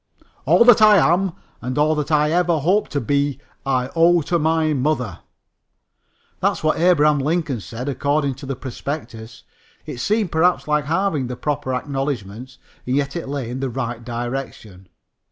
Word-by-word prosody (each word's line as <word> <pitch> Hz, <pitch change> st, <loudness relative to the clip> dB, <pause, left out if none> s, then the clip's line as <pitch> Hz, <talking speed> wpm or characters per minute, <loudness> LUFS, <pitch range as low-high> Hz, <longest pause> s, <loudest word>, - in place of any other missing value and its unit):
"All 235 Hz, -, +5 dB
that 240 Hz, -2 st, +7 dB
I 215 Hz, -1 st, +7 dB
am 180 Hz, +2 st, +2 dB, 0.3 s
and 125 Hz, +2 st, -4 dB
all 150 Hz, +1 st, +3 dB
that 150 Hz, -1 st, -2 dB
I 150 Hz, 0 st, +3 dB
ever 175 Hz, -1 st, +2 dB
hope 185 Hz, +8 st, +1 dB
to 145 Hz, -, -2 dB
be 140 Hz, +2 st, 0 dB, 0.3 s
I 130 Hz, -1 st, 0 dB
owe 170 Hz, 0 st, +4 dB
to 170 Hz, +3 st, 0 dB
my 160 Hz, 0 st, +1 dB
mother." 125 Hz, -, -1 dB, 1.2 s
That's -, -, 0 dB
what 155 Hz, 0 st, +1 dB
Abraham 150 Hz, -4 st, +4 dB
Lincoln 150 Hz, -3 st, -1 dB
said, 115 Hz, +5 st, -7 dB
according 140 Hz, 0 st, 0 dB
to 140 Hz, -, -8 dB
the 135 Hz, -, -3 dB
prospectus. 120 Hz, -3 st, -7 dB, 0.4 s
It -, -, -7 dB
seemed, 210 Hz, -, 0 dB
perhaps, 175 Hz, +2 st, +2 dB
like 150 Hz, -1 st, +1 dB
halving 160 Hz, -4 st, 0 dB
the 125 Hz, -, -5 dB
proper 145 Hz, -3 st, -2 dB
acknowledgments, 130 Hz, -3 st, -4 dB, 0.3 s
and 125 Hz, -, 0 dB
yet 140 Hz, 0 st, -1 dB
it 170 Hz, -5 st, -5 dB
lay 135 Hz, -4 st, -4 dB
in 130 Hz, -, -4 dB
the 135 Hz, -1 st, -2 dB
right 120 Hz, 0 st, -4 dB
direction. 120 Hz, -6 st, -6 dB
145 Hz, 165 wpm, -21 LUFS, 125-160 Hz, 1.2 s, that